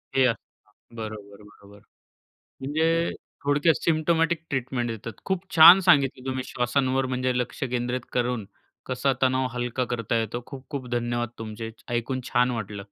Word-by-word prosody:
हे 130 Hz, -, +5 dB, 0.7 s
बरोबर, 110 Hz, -1 st, -5 dB, 0.3 s
बरोबर. 100 Hz, 0 st, -17 dB, 0.8 s
म्हणजे 165 Hz, +4 st, +1 dB, 0.3 s
थोडक्यात 145 Hz, +3 st, +3 dB
सिम्प्टोमॅटिक 165 Hz, +1 st, +2 dB
ट्रीटमेंट 130 Hz, -2 st, -2 dB
देतात. 115 Hz, +1 st, -6 dB
खूप 190 Hz, -1 st, -2 dB
छान 170 Hz, +4 st, +10 dB
सांगितलं 140 Hz, -7 st, +3 dB
तुम्ही 130 Hz, -1 st, -2 dB
श्वासांवर 130 Hz, +2 st, 0 dB
म्हणजे 130 Hz, 0 st, 0 dB
लक्ष 125 Hz, +4 st, -4 dB
केंद्रित 125 Hz, +1 st, -1 dB
करून 125 Hz, -3 st, -1 dB, 0.4 s
कसा 130 Hz, +1 st, 0 dB
तणाव 130 Hz, 0 st, +2 dB
हलका 125 Hz, +1 st, -2 dB
करता 115 Hz, -1 st, -2 dB
येतो. 115 Hz, +2 st, -4 dB
खूप-खूप 135 Hz, -1 st, -7 dB
धन्यवाद 120 Hz, -1 st, -1 dB
तुमचे. 110 Hz, 0 st, -6 dB
च 110 Hz, -, -23 dB
ऐकून 130 Hz, +2 st, -1 dB
छान 125 Hz, +1 st, +3 dB
वाटलं. 105 Hz, -4 st, -4 dB
125 Hz, 135 wpm, -25 LUFS, 120-140 Hz, 0.8 s, छान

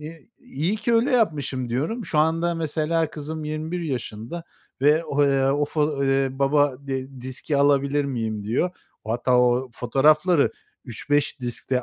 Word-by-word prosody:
eee, 160 Hz, +5 st, -10 dB
"iyi 165 Hz, +10 st, -2 dB
ki 225 Hz, +2 st, 0 dB
öyle 235 Hz, +5 st, +3 dB
yapmışım" 145 Hz, -, 0 dB
diyorum. 160 Hz, -, -2 dB
Şu 150 Hz, -, -1 dB
anda 165 Hz, +2 st, +2 dB
mesela 160 Hz, 0 st, -1 dB
kızım 155 Hz, +1 st, -6 dB
21 155 Hz, +3 st, -3 dB
yaşında 125 Hz, +1 st, -5 dB, 0.4 s
ve, 145 Hz, -, +6 dB
eee, 145 Hz, -3 st, +2 dB
o 140 Hz, +2 st, +2 dB
fo 150 Hz, -2 st, 0 dB
eee, 135 Hz, 0 st, +2 dB
"Baba, 140 Hz, +1 st, +2 dB
d 130 Hz, -1 st, -5 dB
diski 130 Hz, +4 st, -2 dB
alabilir 140 Hz, 0 st, +2 dB
miyim?" 110 Hz, -6 st, -3 dB
diyor. 120 Hz, -, 0 dB, 0.3 s
Hatta 120 Hz, +3 st, +1 dB
o 125 Hz, +1 st, +2 dB
fotoğrafları 150 Hz, +7 st, +3 dB, 0.3 s
3-5 145 Hz, +4 st, -1 dB
diskte 125 Hz, +1 st, -2 dB
145 Hz, 140 wpm, -24 LUFS, 130-160 Hz, 0.4 s, ve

